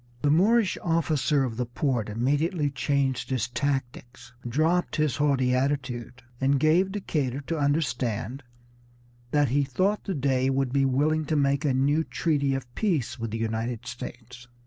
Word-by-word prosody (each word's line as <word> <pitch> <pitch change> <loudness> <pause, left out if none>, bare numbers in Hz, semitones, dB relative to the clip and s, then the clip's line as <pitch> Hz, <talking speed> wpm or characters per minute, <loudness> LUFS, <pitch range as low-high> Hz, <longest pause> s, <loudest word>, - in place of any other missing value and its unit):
The 145 - +3
Moorish 205 +6 +3
officer 155 -4 +1
of 115 -4 -3
the 125 - -1
port 120 -3 -1
immediately 145 - 0
changed 135 0 -1
his 125 -4 0
tactics, 125 -2 -4 0.2
dropped 160 +7 +1
his 155 -4 +1
haughty 135 -4 +2
attitude, 125 -2 -2 0.2
and 135 +1 +3
gave 170 +6 +3
Decatur 145 -9 -2
to 160 +3 -3
understand 135 -4 -1 0.9
that 145 0 +2
he 140 +3 +2
thought 185 +10 0
the 190 - -2
Dey 130 -2 +1
would 135 -1 0
be 140 -1 +3
willing 150 +4 +1
to 155 - -1
make 140 0 +1
a 140 - +2
new 145 +4 +2
treaty 140 -5 0
of 125 -2 -6
peace 165 - -1
with 115 0 -3
the 110 - -3
United 115 +1 -3
States. 125 0 -9
135 Hz, 155 wpm, -26 LUFS, 125-150 Hz, 0.9 s, The